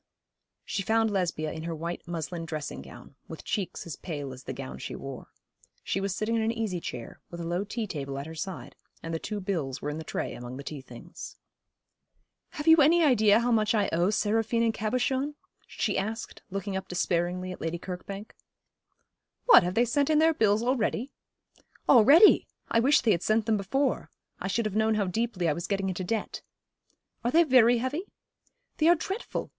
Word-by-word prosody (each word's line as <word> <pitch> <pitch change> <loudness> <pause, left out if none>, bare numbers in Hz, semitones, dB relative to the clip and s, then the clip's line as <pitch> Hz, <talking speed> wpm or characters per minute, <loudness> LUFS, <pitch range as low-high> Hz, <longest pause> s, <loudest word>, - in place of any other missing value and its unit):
She 195 - -2
found 220 +2 +2
Lesbia 170 -5 -1
in 160 - -6
her 165 -1 -3
white 170 +3 -5
muslin 170 0 -4
dressing 150 - -5
gown, 65 -1 -13
with - - -9
cheeks 195 -4 -3
as 165 -5 -6
pale 145 -6 -5
as 130 +1 -12
the - - -4
gown 65 0 -7
she - - -6
wore. - - -8 0.6
She 195 - -1
was 195 -1 -2
sitting 220 +3 -1
in 225 - +1
an 220 +1 +1
easy 220 -6 -2
chair, 120 -7 -7
with 170 - -8
a 170 - -4
low 175 +3 -1
tea 220 +2 -4
table 140 -7 -5
at 140 - -5
her 160 - -8
side, 160 -6 -6 0.3
and 165 - -4
the 165 - -1
two 210 +4 -4
bills 160 -9 -3
were 145 - -3
in 150 - -5
the - - -6
tray - - -4
among 120 +1 -8
the 140 - -7
tea 145 -1 -6
things. - - -10 1.2
'Have 295 - -6
you 320 0 +8
any 330 +3 +5
idea 220 -6 +5
how 245 +1 +1
much 220 0 +2
I 205 -2 +2
owe 175 +3 +2
Seraphine 225 +2 +1
and 225 -1 +2
Cabochon?' 260 +6 -1 0.3
she - - -1
asked, 220 +4 -5
looking 195 0 -4
up 190 0 -4
despairingly 180 +1 -1
at - - -9
Lady 165 +1 -2
Kirkbank. 195 +4 -7 1.1
'What, - - +9
have 180 +1 -2
they 240 - +4
sent 280 +5 +1
in 310 - +4
their 320 +1 +5
bills 215 -4 +2
already?' 250 0 0 0.8
'Already! 280 - +7 0.2
I 230 - +4
wish 275 +6 +4
they 230 - +3
had 175 -4 +1
sent 215 +2 +1
them 220 -1 +2
before. 265 +8 -1 0.3
I - - -3
should 220 +4 0
have 210 -2 -2
known 220 0 +2
how 205 -2 +1
deeply 195 -2 -1
I 155 - +2
was 170 +3 -5
getting 195 -1 -1
into 185 0 -3
debt.' 220 +4 -3 0.8
'Are 240 - +1
they 330 +6 +5
very 245 -5 +5
heavy?' 285 - -3 0.7
'They 310 - +3
are 345 - +7
dreadful! 390 +7 -4
205 Hz, 200 wpm, -28 LUFS, 170-235 Hz, 1.2 s, What